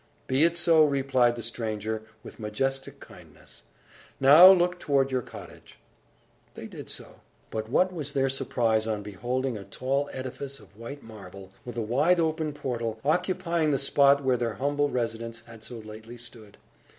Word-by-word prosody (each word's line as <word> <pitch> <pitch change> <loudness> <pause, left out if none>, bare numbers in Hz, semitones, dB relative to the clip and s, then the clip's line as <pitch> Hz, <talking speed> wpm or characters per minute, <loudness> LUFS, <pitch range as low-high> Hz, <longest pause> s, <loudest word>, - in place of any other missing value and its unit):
"Be 135 +3 +2
it 170 +1 +3
so!" 165 -2 +5
replied 135 -4 +2
the 120 - -7
stranger, 110 -2 -3 0.2
with - - -12
majestic 135 +6 -3
kindness, - - -15 0.6
"Now, 145 +7 +9
look 180 -1 +2
toward 135 -3 +1
your 130 -1 0
cottage!" - - -13 0.8
They - - -8
did - - -9
so. - - -6 0.3
But 110 0 -4
what 185 +8 +2
was 145 -5 -5
their 135 -2 +2
surprise 115 -4 0
on 105 -2 -2
beholding 120 +4 -3
a - - -9
tall 135 +6 -2
edifice 135 +1 -6
of 100 - -19
white 120 +6 -9
marble, 100 -3 -12
with 120 -1 -7
a 115 - -1
wide 145 +11 +2
open 160 -1 0
portal, 120 -6 -4
occupying 170 0 +1
the 140 - +2
spot 140 0 +4
where 130 -1 +2
their 115 -3 -2
humble 145 +5 0
residence 115 -2 -3
had 115 -1 -14
so 120 +1 -7
lately 110 +2 -10
stood! 115 -3 -12
130 Hz, 165 wpm, -27 LUFS, 115-145 Hz, 0.8 s, Now